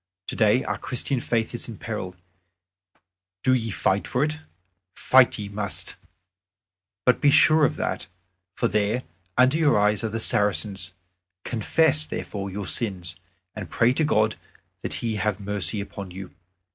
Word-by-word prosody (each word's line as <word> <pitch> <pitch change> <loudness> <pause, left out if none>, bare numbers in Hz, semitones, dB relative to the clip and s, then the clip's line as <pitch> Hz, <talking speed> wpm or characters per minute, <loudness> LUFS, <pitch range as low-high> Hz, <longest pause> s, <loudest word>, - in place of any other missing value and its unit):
Today 110 +7 +2
our - - -3
Christian 130 +1 -2
Faith 115 -1 -1
is 120 - -4
in 110 - -8
peril: 95 -5 -5 1.3
do 130 - +4
ye 115 -3 0
fight 95 -1 0
for 125 - +1
it. 155 +1 -2 0.6
Fight 130 -1 +5
ye 105 -2 -5
must; 100 -1 -3 1.2
be 145 - +4
sure 155 +2 +6
of - - 0
that, - - -3 0.5
for 120 - +1
there 105 +3 0 0.3
under 130 +5 +4
your 145 -9 +4
eyes 105 +1 +2
are 110 - -1
the 115 +1 -3
Saracens. 105 -2 +1 0.5
Confess, 155 +6 +2
therefore, 100 -1 -5
your 100 +1 -5
sins, 90 -7 -2 0.4
and 105 -5 -7
pray 120 +2 +3
to 155 - +1
God 110 -7 +2 0.4
that - - -3
He 110 -2 -1
have 105 -1 -1
mercy 105 +1 -2
upon 100 -1 -7
you. 90 +1 -9
110 Hz, 145 wpm, -25 LUFS, 100-125 Hz, 1.3 s, sure